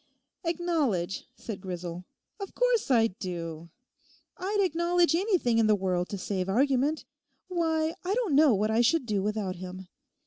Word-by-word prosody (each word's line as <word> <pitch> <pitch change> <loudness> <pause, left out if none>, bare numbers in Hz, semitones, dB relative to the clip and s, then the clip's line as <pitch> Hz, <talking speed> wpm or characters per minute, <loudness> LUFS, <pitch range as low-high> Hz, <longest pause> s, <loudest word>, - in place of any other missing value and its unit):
'Acknowledge!' 310 - -1
said 210 -5 -7
Grisel; 180 -1 -6 0.3
'of 395 - -7
course - - +2
I 235 -4 +5
do. 170 -5 -5 0.7
I'd 395 +3 -2
acknowledge 345 -2 +2
anything 340 - +2
in 225 - +4
the 215 - +5
world 185 -2 -1
to 200 - -4
save 190 0 -3
argument. 275 +6 +1 0.4
Why, 325 -2 0
I 380 +3 0
don't 460 -10 0
know 285 -4 +6
what 210 +2 0
I 225 +2 +3
should 265 +4 +2
do 210 -4 0
without 205 -2 -2
him. 185 0 -8
235 Hz, 150 wpm, -28 LUFS, -, 0.7 s, know